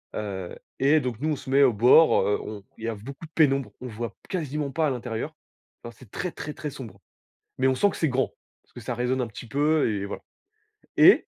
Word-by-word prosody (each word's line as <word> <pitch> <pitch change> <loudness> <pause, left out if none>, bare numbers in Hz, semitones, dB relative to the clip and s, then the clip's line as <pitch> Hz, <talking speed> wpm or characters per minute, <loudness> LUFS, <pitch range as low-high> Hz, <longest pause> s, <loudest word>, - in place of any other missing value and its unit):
Heu, 95 -4 -4 0.2
et 145 +3 +5
donc 125 -5 -4
nous, 155 - 0
on - - +1
se 130 - -10
mets 140 +1 +5
au 130 -4 +5
bord, 125 +9 +6
heu, 105 - +1
on, 105 -2 -7
il - - -12
y - - -1
a 115 - -1
v 100 - -11
beaucoup 140 +5 -8
de 160 - -16
pénombre, 140 -4 +2
on 125 - -5
voit 115 +1 -4
p - - -38
quasiment 150 -5 -2
pas 155 +2 +1
à - - +1
l'intérieur. 120 -3 -4 0.5
Non 120 - -7
c'est 120 -2 -17
très 180 - -3
très 150 0 -6
très 150 - -5
sombre, 115 -8 -10 0.6
mais 130 - +2
on 130 - +3
sent 200 +10 +3
que - - -8
c'est 160 - +1
grand, 130 -1 0 0.3
parce - - -34
que - - -10
ça 120 +1 -4
résonne 125 +2 0
un 120 - 0
petit 115 +3 -10
peu 145 -1 +2
et 100 -1 -2
voilà 100 - -7 0.8
et - - +7
130 Hz, 250 wpm, -26 LUFS, 115-150 Hz, 0.8 s, et